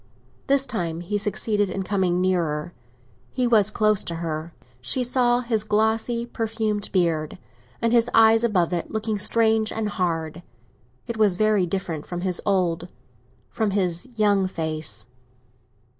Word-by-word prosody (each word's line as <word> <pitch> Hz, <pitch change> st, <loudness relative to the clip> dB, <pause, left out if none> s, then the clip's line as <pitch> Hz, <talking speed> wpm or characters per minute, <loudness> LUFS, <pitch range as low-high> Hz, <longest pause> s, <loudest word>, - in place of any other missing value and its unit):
This 275 Hz, 0 st, +3 dB
time 175 Hz, -10 st, -3 dB
he 205 Hz, +4 st, -2 dB
succeeded 205 Hz, 0 st, 0 dB
in 190 Hz, +1 st, -3 dB
coming 185 Hz, -3 st, 0 dB
nearer—he 150 Hz, -, -3 dB
was 215 Hz, -4 st, +4 dB
close 215 Hz, -2 st, +2 dB
to 170 Hz, -, -4 dB
her; 165 Hz, 0 st, -4 dB, 0.3 s
she 250 Hz, -, 0 dB
saw 245 Hz, 0 st, +2 dB
his 230 Hz, -3 st, -1 dB
glossy 220 Hz, +2 st, 0 dB
perfumed 220 Hz, -3 st, -2 dB
beard, 165 Hz, -5 st, 0 dB, 0.5 s
and 230 Hz, 0 st, +2 dB
his 235 Hz, 0 st, +4 dB
eyes 225 Hz, 0 st, +5 dB
above 185 Hz, -7 st, +1 dB
it 170 Hz, -, -2 dB
looking 220 Hz, -1 st, -2 dB
strange 220 Hz, +1 st, +2 dB
and 220 Hz, -1 st, -2 dB
hard. 165 Hz, -4 st, -2 dB, 0.6 s
It 235 Hz, -, -5 dB
was 210 Hz, -4 st, +3 dB
very 210 Hz, -2 st, +2 dB
different 165 Hz, -4 st, -4 dB
from 175 Hz, -1 st, -5 dB
his 180 Hz, -2 st, 0 dB
old—from 170 Hz, -, -3 dB
his 185 Hz, +1 st, -1 dB
young—face. 160 Hz, -, 0 dB
195 Hz, 130 wpm, -24 LUFS, 170-220 Hz, 0.6 s, eyes